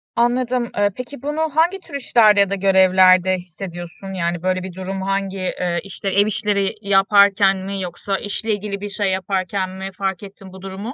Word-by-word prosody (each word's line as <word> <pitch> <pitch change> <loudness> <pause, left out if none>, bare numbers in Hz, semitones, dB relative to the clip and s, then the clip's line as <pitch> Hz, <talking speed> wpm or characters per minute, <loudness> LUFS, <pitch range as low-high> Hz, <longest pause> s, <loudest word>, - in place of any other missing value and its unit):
Anladım. 245 +1 +1
Iıı, 205 0 +2
peki, 250 +1 -8
bunu 295 +3 -3
hangi 345 +5 +2
tür 335 -5 -11
işlerde 225 -6 +4
ya 200 -1 +4
da 200 - -1
görevlerde 185 -1 +4
hissediyorsun, 175 +1 -9
yani, 170 -2 -2
böyle 185 0 0
bir 190 -1 -7
durum 190 +1 -5
hangi? 195 0 -2
Iıı, 180 -2 -2
işte, 195 0 -5
ev 200 +2 +3
işleri 205 -2 0
yaparken 200 0 +4
mi 195 +1 -5
yoksa 190 +2 -3
işle 215 +2 -2
ilgili 200 -1 -4
bir 205 - -5
şey 200 -1 -1
yaparken 190 0 -2
mi 190 +1 -6
fark 195 -1 -3
ettin 195 -1 -12
bu 190 - -12
durumu? 195 +5 -7
195 Hz, 180 wpm, -20 LUFS, 185-205 Hz, -, işlerde